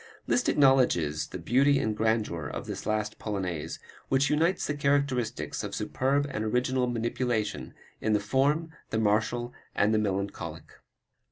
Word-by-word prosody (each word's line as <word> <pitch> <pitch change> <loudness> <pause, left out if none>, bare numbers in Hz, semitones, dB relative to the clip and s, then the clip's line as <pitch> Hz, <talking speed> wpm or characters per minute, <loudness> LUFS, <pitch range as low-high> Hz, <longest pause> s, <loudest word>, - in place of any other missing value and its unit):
Liszt 250 - +2
acknowledges 90 - +3
the - - -6
beauty 135 - +3
and 110 -4 0
grandeur 110 -8 0
of - - -5
this - - -6
last 110 0 -1
Polonaise, 95 -7 -3 0.3
which 135 +2 +3
unites 165 +5 +2
the 145 - -1
characteristics 140 -4 0
of - - -4
superb 140 +2 0
and 110 - -2
original 125 +3 +1
manipulation 115 -2 -2 0.3
of 110 - +1
the 105 - +3
form, 140 +9 +1 0.2
the - - -1
martial 110 +3 +1 0.2
and 105 +2 +3
the 110 - +3
melancholic. 100 -1 -3
115 Hz, 145 wpm, -28 LUFS, 105-135 Hz, 0.3 s, acknowledges